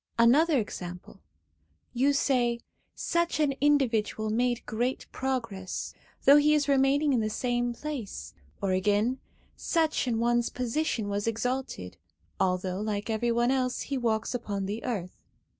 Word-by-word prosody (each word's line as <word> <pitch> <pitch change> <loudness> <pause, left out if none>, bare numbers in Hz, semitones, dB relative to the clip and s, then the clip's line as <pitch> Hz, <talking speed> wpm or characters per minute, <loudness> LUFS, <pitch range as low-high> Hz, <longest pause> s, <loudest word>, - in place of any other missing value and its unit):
Another 280 +7 +5
example: 180 -5 -6 0.7
you 265 +3 +3
say, 250 -4 +1 0.4
'such 340 -1 0
an 295 -3 +2
individual 230 -7 +2
made 240 +1 0
great 245 +4 -2
progress,' 230 -8 -3 0.3
though 280 +2 +9
he 300 +1 +5
is 290 -1 +1
remaining 280 +1 +3
in 245 - +3
the 215 -1 0
same 240 +2 -1
place; 235 - -6 0.3
or 195 - +1
again, 205 +7 +1 0.4
'such 320 -5 0
an 230 -2 +1
one's 240 +1 +2
position 250 -2 -1
was 205 +1 -2
exalted/ 230 - -3 0.4
although, 185 +1 0
like 210 0 -2
every 235 +2 0
one 240 +2 +2
else, 255 -2 0
he 280 - -3
walks 225 -2 0
upon 205 -5 -3
the 210 +4 -4
earth. 195 -8 -4
240 Hz, 140 wpm, -28 LUFS, 215-270 Hz, 0.7 s, though